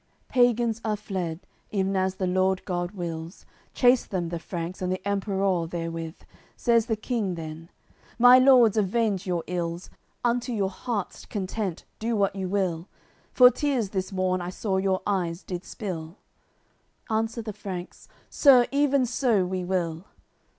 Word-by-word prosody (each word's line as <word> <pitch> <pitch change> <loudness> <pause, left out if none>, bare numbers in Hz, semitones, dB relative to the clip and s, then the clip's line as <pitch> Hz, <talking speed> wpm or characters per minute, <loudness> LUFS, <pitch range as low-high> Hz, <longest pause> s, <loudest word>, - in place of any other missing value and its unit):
CCLXIII - - -41
Pagans 240 -2 +2
are 215 -1 0
fled, 185 -6 -4 0.3
ev'n 195 -1 0
as 190 0 0
the 190 - -2
Lord 185 +1 +1
God 175 -2 -2
wills; 170 -2 -6 0.3
Chase 245 0 +5
them 175 -4 -3
the 170 0 -4
Franks, 170 +2 -5
and 185 0 -1
the 185 +1 -3
Emperour 195 -3 0
therewith. 165 -1 -4 0.4
Says 235 -2 +2
the 225 - +1
King 215 -4 -2
then: 160 0 -8 0.5
"My 245 +1 +8
Lords, 250 -5 +6
avenge 205 -1 +1
your 175 -2 -1
ills, 170 0 -4 0.3
Unto 245 +1 0
your 195 -3 0
hearts' 205 -1 -4
content, 195 -3 -3
do 230 +1 -1
what 200 -2 +1
you 190 -2 -3
will! 185 -3 -1 0.4
For 250 -1 +8
tears, 255 -5 -1
this 190 -1 -2
morn, 185 -1 0
I 175 - -4
saw 190 +1 -2
your 190 0 0
eyes 180 -3 -1
did 180 -1 -5
spill." 175 -5 -6 0.9
Answer 225 +1 -1
the 215 -1 -5
Franks: 185 -3 -7 0.2
"Sir, 260 -4 +6
even 280 -2 +3
so 235 -5 +1
we 185 0 -3
will." 175 -2 -2
190 Hz, 155 wpm, -26 LUFS, 180-225 Hz, 0.9 s, My